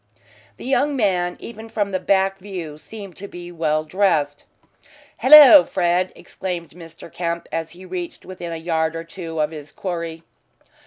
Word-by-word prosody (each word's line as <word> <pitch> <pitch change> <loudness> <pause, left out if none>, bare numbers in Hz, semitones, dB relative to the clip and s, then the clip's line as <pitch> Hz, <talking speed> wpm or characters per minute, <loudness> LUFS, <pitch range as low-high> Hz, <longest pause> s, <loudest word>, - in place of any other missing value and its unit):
The - - -10
young 275 +2 +1
man, 180 -7 0
even 225 -1 -9
from 205 -3 -2
the 185 - -1
back 195 0 +1
view, 180 -6 -7
seemed 200 0 -10
to 200 - -8
be 175 -2 -9
well 155 -2 0
dressed. 155 -4 0 0.7
"Hallo, 295 +1 +10
Fred," 180 0 0
exclaimed 175 -3 -6
Mr. 165 -1 -13
Kemp, 170 -1 -3
as 165 0 -3
he 185 +2 -13
reached 180 -1 -6
within 175 -2 -7
a 165 - -4
yard 160 -1 -1
or 165 - -4
two 165 -1 -7
of 150 0 +1
his 150 -2 -9
quarry. 170 -3 -5
175 Hz, 160 wpm, -21 LUFS, 165-195 Hz, 0.7 s, Hallo